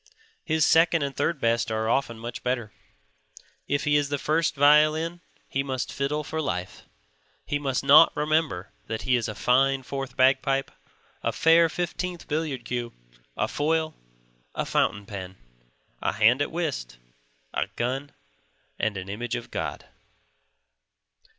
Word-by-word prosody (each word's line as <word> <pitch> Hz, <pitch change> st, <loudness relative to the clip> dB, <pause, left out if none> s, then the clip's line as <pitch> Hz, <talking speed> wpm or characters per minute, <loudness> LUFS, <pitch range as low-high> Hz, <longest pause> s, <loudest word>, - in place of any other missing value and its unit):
His 160 Hz, -1 st, +2 dB
second 165 Hz, -1 st, +4 dB
and 140 Hz, -1 st, -3 dB
third 150 Hz, +2 st, 0 dB
best 115 Hz, -1 st, +1 dB
are 110 Hz, 0 st, -1 dB
often 115 Hz, -1 st, 0 dB
much 120 Hz, +1 st, -7 dB
better. 120 Hz, -4 st, -2 dB, 0.9 s
If 145 Hz, +1 st, 0 dB
he 145 Hz, -1 st, +3 dB
is 145 Hz, -1 st, 0 dB
the 145 Hz, -, 0 dB
first 155 Hz, +2 st, 0 dB
violin 155 Hz, +4 st, +4 dB, 0.3 s
he 135 Hz, -, -1 dB
must 130 Hz, -2 st, -3 dB
fiddle 150 Hz, +2 st, -1 dB
for 160 Hz, +2 st, -3 dB
life; 90 Hz, -, -4 dB, 0.6 s
he 145 Hz, -, -1 dB
must 135 Hz, -3 st, -1 dB
not 145 Hz, +4 st, +8 dB
remember 150 Hz, -, 0 dB, 0.2 s
that 110 Hz, 0 st, -4 dB
he 130 Hz, -1 st, +2 dB
is 120 Hz, -2 st, 0 dB
a 105 Hz, -, -5 dB
fine 135 Hz, +4 st, +2 dB
fourth 135 Hz, 0 st, -5 dB
bagpipe, 135 Hz, +1 st, +2 dB, 0.5 s
a -, -, 0 dB
fair 165 Hz, 0 st, +5 dB
fifteenth 175 Hz, +1 st, -4 dB
billiard 150 Hz, -5 st, -2 dB
cue, 120 Hz, -1 st, -3 dB, 0.4 s
a -, -, +1 dB
foil, 155 Hz, +1 st, 0 dB, 0.6 s
a -, -, -1 dB
fountain 100 Hz, 0 st, 0 dB
pen, 95 Hz, -2 st, -7 dB, 0.6 s
a -, -, 0 dB
hand 115 Hz, +5 st, +4 dB
at 145 Hz, -, 0 dB
whist, 145 Hz, -, -3 dB, 0.6 s
a -, -, 0 dB
gun, 135 Hz, +4 st, -2 dB, 0.7 s
and 110 Hz, -2 st, 0 dB
an 95 Hz, 0 st, -6 dB
image 110 Hz, +4 st, -3 dB
of -, -, -7 dB
God. -, -, -4 dB
140 Hz, 145 wpm, -26 LUFS, 120-155 Hz, 0.9 s, not